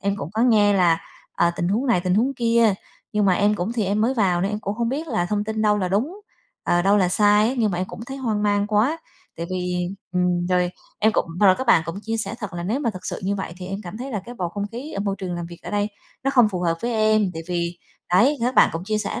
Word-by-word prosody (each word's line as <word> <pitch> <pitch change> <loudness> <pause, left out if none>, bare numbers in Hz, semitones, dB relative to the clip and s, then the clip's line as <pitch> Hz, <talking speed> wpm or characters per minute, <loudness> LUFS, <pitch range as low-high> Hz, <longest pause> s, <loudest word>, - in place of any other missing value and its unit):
Em 200 0 -1
cũng 160 -6 -6
có 220 +2 +1
nghe 210 -4 +4
là, 175 -4 +3 0.3
ờ, 170 - +2
tình 175 - -1
huống 225 +8 0
này 235 -8 +3
tình 180 0 0
huống 255 +6 +2
kia, 230 -3 +3 0.4
nhưng 210 -1 +2
mà 185 - +4
em 205 +2 +2
cũng 200 +3 -2
thì 225 -4 0
em 200 +3 0
mới 245 +5 +2
vào 185 -6 +2
nên 195 - 0
em 210 0 -3
cũng 200 0 -3
hông 235 +1 -1
biết 295 +6 -3
là 220 -9 0
thông 205 +2 -1
tin 220 0 -2
đâu 210 -1 +3
là 185 - -1
đúng, 270 - -1 0.4
ờ, 175 0 +2
đâu 200 +2 +4
là 185 -3 +3
sai 210 +3 +4
á. 255 - -1
Nhưng 220 -3 +2
mà 175 - -2
em 185 - -1
cũng - - -9
thấy 270 - -6
hoang 220 -6 -1
mang 205 0 +2
quá, 220 +10 +1 0.4
tại 170 - -4
vì 180 -1 -2 0.2
ừm, 180 -1 +1
rồi, 180 -1 +1 0.3
em 220 +1 +3
cũng - - +1
rồi 195 -3 +7
các 260 - -3
bạn 200 -8 +5
cũng 165 +4 -5
chia 225 +1 -2
sẻ 220 0 -3
thật 210 -6 -6
là 175 - -4
nếu 220 +10 -1
mà 235 - 0
thực 185 -3 -9
sự - - -4
như 200 +2 0
vậy 190 -3 -5
thì 180 - -8
em 195 +1 -4
cảm 185 +2 -8
thấy 265 +2 -5
là 210 - -2
cái 245 - -9
bầu 180 -6 -3
không 200 +3 -4
khí 260 +7 -7
ở 200 - -3
môi 200 -1 -1
trường 180 -2 -4
làm 175 -1 -4
việc 170 0 -12
ở - - -7
đây 205 0 0 0.4
nó 275 - +2
không 245 -5 +5
phù 185 -3 -4
hợp 170 -2 +1
với 240 +1 -1
em. 215 -2 +3
Tại 165 - -5
vì 170 0 -2 0.3
đấy, 250 +11 +5
các 250 +2 0
bạn - - +6
cũng 165 +2 -4
chia 215 +1 -1
sẻ 200 -1 -3
205 Hz, 295 wpm, -23 LUFS, 180-225 Hz, 0.4 s, rồi